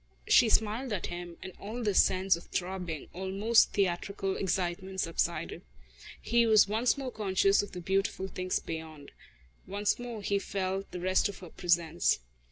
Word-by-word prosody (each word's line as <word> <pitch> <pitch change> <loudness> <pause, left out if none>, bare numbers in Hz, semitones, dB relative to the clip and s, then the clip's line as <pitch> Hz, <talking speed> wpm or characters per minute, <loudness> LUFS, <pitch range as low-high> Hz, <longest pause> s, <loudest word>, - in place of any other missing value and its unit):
She 235 - +6
smiled 225 +4 +1
at 190 - -2
him 175 -1 -7
and 190 -1 -8
all 230 +4 -5
this 205 -3 +5
sense 190 0 +2
of 170 - -11
throbbing, 180 -4 -4
almost 195 +5 +2
theatrical 195 0 -1
excitement 190 0 -2
subsided. 165 -2 -1 0.6
He 235 0 +2
was 215 -2 +6
once 225 +6 +1
more 265 -2 -4
conscious 195 -2 +2
of 205 - -8
the 180 - -6
beautiful 190 +1 -1
things 185 -1 -2
beyond. 160 -3 -7 0.6
Once 205 +3 0
more 235 -4 -6
he 200 0 +1
felt 195 0 -3
the 180 - -6
rest 185 +3 +2
of 200 - -8
her 180 - -10
presence. 170 -2 +1
190 Hz, 160 wpm, -30 LUFS, 180-205 Hz, 0.6 s, She